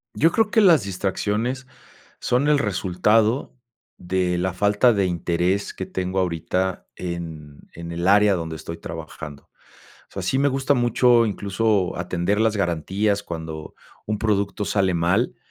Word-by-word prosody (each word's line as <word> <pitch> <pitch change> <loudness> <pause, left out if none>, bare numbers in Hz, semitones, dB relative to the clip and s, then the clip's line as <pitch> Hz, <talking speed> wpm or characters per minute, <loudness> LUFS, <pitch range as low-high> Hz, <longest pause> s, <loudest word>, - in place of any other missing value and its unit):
Yo 165 +2 +4
creo 225 -1 +2
que 220 - +3
las 170 - +6
distracciones 105 +6 -2 0.5
son 125 +4 +1
el 150 -1 +4
resultado 105 +3 +1 0.4
de 90 0 -1
la 95 +1 -1
falta 105 +6 +3
de 100 -2 +1
interés 90 +2 -1
que 95 - -5
tengo 95 +1 -2
ahorita 90 +1 -1
en 80 -4 -7
en 85 0 -8
el 85 +2 -2
área 105 +1 +5
donde 80 -3 -3
estoy 85 +1 -7
trabajando, 80 -3 -9 0.6
o - - -34
sea, - - -4
sí 130 - 0
me 140 - +3
gusta 135 +1 +1
mucho, 120 -1 +4
incluso 100 -1 0
atender 90 +3 -1
las 110 -1 +1
garantías 100 +3 0
cuando 80 -3 -7 0.3
un 105 0 -1
producto 105 -1 0
sale 95 -3 +1
mal 90 +9 +1
95 Hz, 145 wpm, -23 LUFS, 85-110 Hz, 0.6 s, las